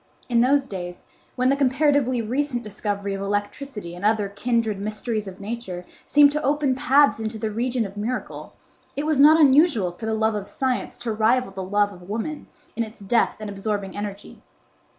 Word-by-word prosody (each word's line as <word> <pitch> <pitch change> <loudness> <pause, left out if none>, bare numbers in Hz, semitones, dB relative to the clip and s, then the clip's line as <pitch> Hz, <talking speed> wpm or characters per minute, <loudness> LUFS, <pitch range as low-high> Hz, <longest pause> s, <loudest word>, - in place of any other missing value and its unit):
In 235 -1 +3
those 270 +2 +3
days 180 -5 -7 0.3
when 255 0 +2
the 275 - +3
comparatively 270 -2 +2
recent 250 +1 -1
discovery 205 -1 -3
of 195 - -4
electricity 205 0 -4
and 175 +2 -9
other 210 -1 +2
kindred 220 0 -1
mysteries 215 +1 -3
of 190 0 -9
Nature 200 -4 -6 0.2
seemed 290 -1 +6
to 300 +1 -2
open 285 -1 +1
paths 285 -1 +4
into 220 0 -3
the 220 0 -3
region 240 +1 -1
of 195 0 -8
miracle, 240 +5 -4 0.4
it 285 - -2
was 310 -3 +1
not 305 +3 +8
unusual 280 - +5
for 220 +6 -7
the 220 - 0
love 220 0 +1
of 205 -1 -4
science 260 -2 -2
to 240 -1 -3
rival 225 +2 +2
the 190 0 -6
love 205 +2 +1
of 180 0 -14
woman 230 +8 -4 0.3
in 230 - -1
its 220 0 -5
depth 210 +4 +1
and 215 - -6
absorbing 200 -1 -3
energy. 205 0 -7
225 Hz, 185 wpm, -23 LUFS, 205-260 Hz, 0.4 s, not